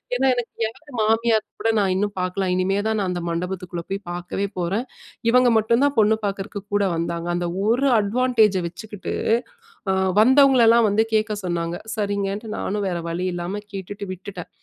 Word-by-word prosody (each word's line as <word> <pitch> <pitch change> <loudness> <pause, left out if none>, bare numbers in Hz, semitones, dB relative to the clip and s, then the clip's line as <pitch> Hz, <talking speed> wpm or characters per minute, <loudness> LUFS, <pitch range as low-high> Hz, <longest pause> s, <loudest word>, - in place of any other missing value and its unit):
ஏன்னா, 265 +2 +1
எனக்கு 240 -1 -3 0.2
யார் 225 - -9 0.2
மாமியார் 225 0 +2 0.2
கூட 225 - +1
நான் 190 -2 +2
இன்னும் 205 +1 -1
பார்க்கல. 185 +1 -1
இனிமே 190 +2 +1
தான் 220 -1 0
நான் 190 -2 -1
அந்த 175 -1 -3
மண்டபத்துக்குள்ள 180 0 -4
போய் 195 - -1
பார்க்கவே 180 +3 -3
போறேன். 195 +8 -1 0.5
இவங்க 250 0 +5
மட்டும் 230 +4 +2
தான் 285 -2 +1
பொண்ணு 220 +1 +4
பார்க்கிறக்கு 200 0 -4
கூட 205 -1 +3
வந்தாங்க. 170 0 -3
அந்த 175 0 -1 0.2
ஒரு 250 +5 +3
அட்வான்டேஜ 220 -1 +2
வச்சுக்கிட்டு 200 +3 -7 0.8
அ - - +2 0.3
வந்தவங்கள 265 +1 +6
எல்லாம் 230 0 +6
வந்து 215 +2 +3
கேட்க 215 0 +1
சொன்னாங்க. 170 -1 -2 0.2
சரிங்கன்ட்டு 200 +1 -2
நானும் 205 0 -2
வேற 175 - -2
வழி 175 +2 -2
இல்லாம 175 +4 -3
கேட்டுட்டு 200 +1 -6
விட்டுட்டேன். 185 -1 -9
200 Hz, 165 wpm, -22 LUFS, 180-225 Hz, 0.8 s, வந்தவங்கள